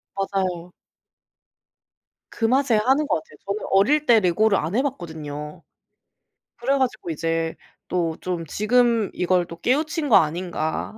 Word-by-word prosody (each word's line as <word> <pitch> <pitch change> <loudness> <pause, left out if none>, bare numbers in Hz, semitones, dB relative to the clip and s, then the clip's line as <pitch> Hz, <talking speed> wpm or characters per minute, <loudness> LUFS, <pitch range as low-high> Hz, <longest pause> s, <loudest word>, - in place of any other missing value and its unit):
맞아요. 185 -3 -2 1.6
그 225 - -2
맛에 260 +1 +3
하는 265 +8 +2
것 - - +1
같아요. 155 -1 -8
저는 200 +2 -3
어릴 285 +11 +3
때 235 -3 +6
레고를 200 +2 +2
안 165 +6 -2
해 255 - +3
봤거든요. 155 - -6 0.9
그래 265 +4 0
가지고 255 -9 -2
이제 165 0 -2 0.3
또 165 -3 -1
좀 175 -2 -3
지금 230 +4 +2
이걸 180 0 +1
또 170 0 -11
깨우친 300 - 0
거 220 - +8
아닌가. 165 +2 -1
195 Hz, 255 characters per minute, -23 LUFS, 165-245 Hz, 1.6 s, 거